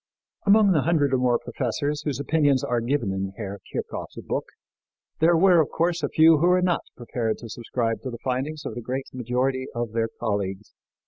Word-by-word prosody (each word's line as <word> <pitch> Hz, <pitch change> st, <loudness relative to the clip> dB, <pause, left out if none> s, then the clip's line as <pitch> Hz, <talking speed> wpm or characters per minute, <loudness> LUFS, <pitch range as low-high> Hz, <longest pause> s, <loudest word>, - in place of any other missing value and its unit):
Among 205 Hz, 0 st, +6 dB
the 155 Hz, -5 st, +3 dB
hundred 150 Hz, -3 st, +2 dB
and 130 Hz, -, +2 dB
more 125 Hz, -1 st, +3 dB
professors 145 Hz, +6 st, -2 dB
whose 145 Hz, -3 st, -3 dB
opinions 145 Hz, -2 st, +2 dB
are 120 Hz, -1 st, 0 dB
given 120 Hz, -4 st, 0 dB
in 95 Hz, 0 st, -3 dB
Herr 100 Hz, -2 st, -5 dB
Kirchhoff's -, -, -5 dB
book -, -, -1 dB, 0.7 s
there 165 Hz, +1 st, +5 dB
were, 180 Hz, -1 st, +6 dB
of 150 Hz, -, -1 dB
course, 170 Hz, +1 st, 0 dB
a 145 Hz, -, -1 dB
few 160 Hz, -1 st, +6 dB
who 170 Hz, -, +3 dB
were 180 Hz, 0 st, +4 dB
not 180 Hz, -1 st, +1 dB, 0.2 s
prepared 115 Hz, -2 st, -2 dB
to 115 Hz, -, -10 dB
subscribe 115 Hz, 0 st, -2 dB
to 130 Hz, -, -5 dB
the 120 Hz, -, -6 dB
findings 135 Hz, +4 st, -2 dB
of -, -, -4 dB
the 120 Hz, -, -6 dB
great 130 Hz, +3 st, -3 dB
majority 130 Hz, +2 st, -1 dB
of 120 Hz, -2 st, -2 dB
their 115 Hz, 0 st, 0 dB
colleagues. 100 Hz, -3 st, -3 dB
130 Hz, 195 wpm, -25 LUFS, 115-155 Hz, 0.7 s, Among